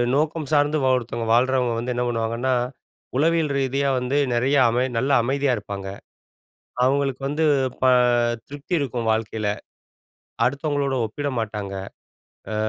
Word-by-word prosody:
நோக்கம் 155 +1 0
சார்ந்து 145 +1 +3 0.2
ஒருத்தவங்க 115 -2 -3
வாழ்றவங்க 125 0 +2
வந்து 125 +2 -2
என்ன 125 - 0
பண்ணுவாங்கன்னா, 115 +2 -1 0.6
உளவியல் 160 0 +2
ரீதியா 135 +1 0
வந்து 125 +3 -1 0.2
நெறைய 130 +4 +2
அமை 120 +2 +1
நல்ல 135 +4 +1
அமைதியா 135 +2 +1
இருப்பாங்க. 100 -1 -6 1.0
அவங்களுக்கு 135 0 +1
வந்து 150 +3 0 0.4
ப - - +4 0.6
திருப்தி 145 +5 -9
இருக்கும் 125 -5 -2
வாழ்க்கையில 110 -1 -2 1.0
அடுத்தவங்களோட 140 +1 0
ஒப்பிட 145 +7 -4
மாட்டாங்க. 105 -3 -4 0.8
ஆ - - -2
130 Hz, 120 wpm, -23 LUFS, 115-140 Hz, 1.0 s, ப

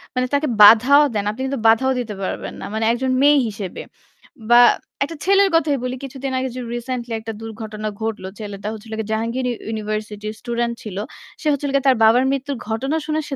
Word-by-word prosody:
মানে 255 0 +1
তাকে 285 +2 +1
বাধাও 250 +8 +8
দেন। 205 -1 -1
আপনি 230 +5 -5
কিন্তু 275 -2 -3
বাধাও 260 +4 +4
দিতে 215 -4 -4
পারবেন - - -4
না। - - -5
মানে 220 0 -1
একজন 255 +2 -1
মেয়ে 290 0 +6
হিসেবে। 200 -4 -6 0.7
বা 240 0 +8 0.4
একটা 330 +4 -5
ছেলের 395 0 +4
কথাই 295 -4 +2
বলি, 255 0 -2
কিছুদিন 270 0 -5
আগে 260 - -2
যে 255 - -4
রিসেন্টলি 240 -1 -4
একটা 220 0 -6
দুর্ঘটনা 215 -1 -6
ঘটল। 220 -3 -3 0.2
ছেলেটা 205 -1 -6
হচ্ছে 220 0 -10
হল 220 - -8
গিয়ে 220 -1 -4
জাহাঙ্গীর 230 +4 -1 0.2
ইউনিভার্সিটির 215 -1 -4
স্টুডেন্ট 235 -1 -2
ছিল। 200 -4 -7 0.4
সে - - -12
হচ্ছে 285 0 -2
হল 280 - -1
গিয়ে 275 - +1
তার 260 - +5
বাবার 235 +4 +5
মৃত্যু 275 +1 -2 0.2
ঘটনা 265 +8 -1
শুনে 310 0 -1
সে 275 - -3
240 Hz, 200 wpm, -20 LUFS, 220-270 Hz, 0.7 s, বাধাও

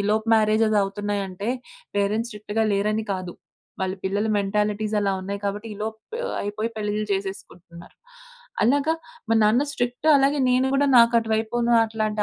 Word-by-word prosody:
ఈలోపు 215 +2 0
మ్యారేజెసవుతున్నాయంటే 205 -2 0 0.5
పేరెంట్స్ 210 +4 0
స్ట్రిక్ట్‌గా 210 +1 -3
లేరని 210 +2 0
కాదు, 185 -2 -5 0.5
వాళ్ళ 190 0 -1
పిల్లల 200 +3 0
మెంటాలిటీస్ 210 +1 -1
అలా 200 -1 +1
ఉన్నాయి 200 +1 -5
కాబట్టి 205 +2 -3
ఈలోపు 220 +2 -5 0.4
అయిపోయి 210 +3 -3
పెళ్లిలు 210 0 -2
చేసేసుకుంటున్నారు. 180 -3 -7 0.7
అలాగా, 285 +6 +3 0.3
మా 225 - +3
నాన్న 220 +5 +4
స్ట్రిక్ట్ 245 +2 -3
అలాగే 280 +1 +2
నేను 255 +1 +3
కూడా 285 +1 +3
నాకు 235 0 +6
అటువైపును 225 +1 0
అట్లాంటి 215 -1 -2
215 Hz, 130 wpm, -24 LUFS, 200-225 Hz, 0.7 s, నాకు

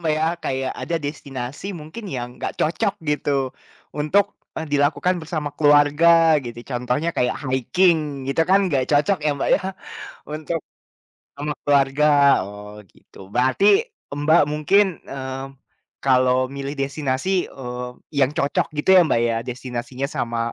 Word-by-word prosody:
Mbak 160 -2 +1
ya, 160 - +1 0.2
kayak 130 0 -2
ada 170 - -1
destinasi 140 -1 -6
mungkin 160 +9 -9
yang 120 -2 -4
nggak - - -4
cocok 195 +6 0 0.2
gitu 150 0 -1 0.6
untuk, 155 +7 +1 0.2
eee, 160 - -4
dilakukan 145 +5 +2
bersama 155 -2 -3
keluarga 155 +2 +5
gitu. 120 -1 -7
Contohnya 125 +6 -1
kayak 125 - +1
haiking 145 +1 +1
gitu 140 +4 0
kan 195 0 +4
nggak 140 -7 +1
cocok 150 +7 +3
ya - - +3
Mbak - - -1
ya, - - +1 0.7
untuk 155 +2 -3 0.8
sama 150 +1 -3
keluarga, 140 0 +3 0.4
oh 105 +1 -10
gitu. - - -21
Berarti 130 - +2 0.5
Mbak 145 +3 +3
mungkin, 155 +7 +4 0.2
mmm, 135 0 -5 0.6
kalau 130 -1 +3
milih 140 +1 -5
destinasi, 135 +2 -2 0.2
eee, 125 -1 -6 0.3
yang 135 0 +3
cocok 140 - +1
gitu 150 - -1
ya - - +8
Mbak 115 - +2
ya, 115 - 0
destinasinya 125 +1 -4
sama 115 -1 -2
145 Hz, 135 wpm, -22 LUFS, 130-155 Hz, 0.8 s, ya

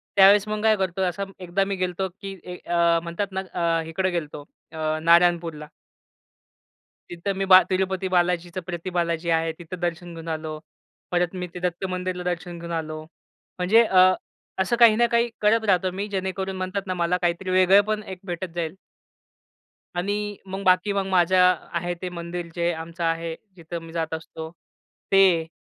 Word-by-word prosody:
त्यावेळेस 200 +1 +7
मग 215 0 -2
काय 220 -1 +5
करतो 190 -1 -2
असा 185 +2 -1 0.2
एकदा 180 +1 0
मी 200 0 -2
गेलो 185 -1 -1
होतो, 190 - +1
की 195 0 -6 0.3
अ, 170 -1 +3
म्हणतात 170 +4 -3
ना 190 0 -2
अ, 165 -1 +1
इकडे 185 +4 0
गेलो 170 -3 -2
होतो 145 - -9 0.3
अ, 155 0 -1
नारायणपूरला. 170 -2 +3 1.4
तिथं 175 +3 -3
मी 195 - 0
बा 185 0 +11
तिरुपती 190 0 0
बालाजीचं 175 +1 0
प्रती 175 0 -5
बालाजी 170 0 0
आहे 165 0 0
तिथं 175 +1 -8
दर्शन 175 0 -3
घेऊन 165 0 -9
आलो. 155 0 -5 0.6
परत 175 -1 +1
मी 180 - -3
ते 180 - -6
दत्त 180 +1 -2
मंदिरला 180 0 -3
दर्शन 175 0 -4
घेऊन 170 0 -7
आलो. 155 -1 -6 0.6
म्हणजे 210 +6 +5
अ, 190 -5 +4 0.6
असं 215 +6 0
काही 230 -2 +8
ना 240 +2 +4
काही 235 0 +3
करत 220 +2 +3
राहतो 185 0 +2
मी 205 - -2
जेणेकरून 190 0 -2
म्हणतात 190 +1 -3
ना, 185 - -1
मला 175 0 +1
काहीतरी 175 +2 -1
वेगळं 185 +2 +6
पण 215 0 -1
एक 185 - -11
भेटत 175 -1 -5
जाईल. 165 0 -3 1.2
आणि 205 +3 -2
मग 190 +1 -6
बाकी 185 +2 +3
मग 195 -1 0
माझं 180 0 +4 0.2
आहे 175 +1 -1
ते 185 - -3
मंदिर 170 0 -6
जे 170 0 +1
आमचं 165 +1 -6
आहे 165 0 -1 0.2
जिथं 170 -1 -7
मी 165 0 -11
जात 165 -1 -2
असतो. 160 0 -6 0.6
ते 185 -4 +5
180 Hz, 175 wpm, -24 LUFS, 170-190 Hz, 1.4 s, बा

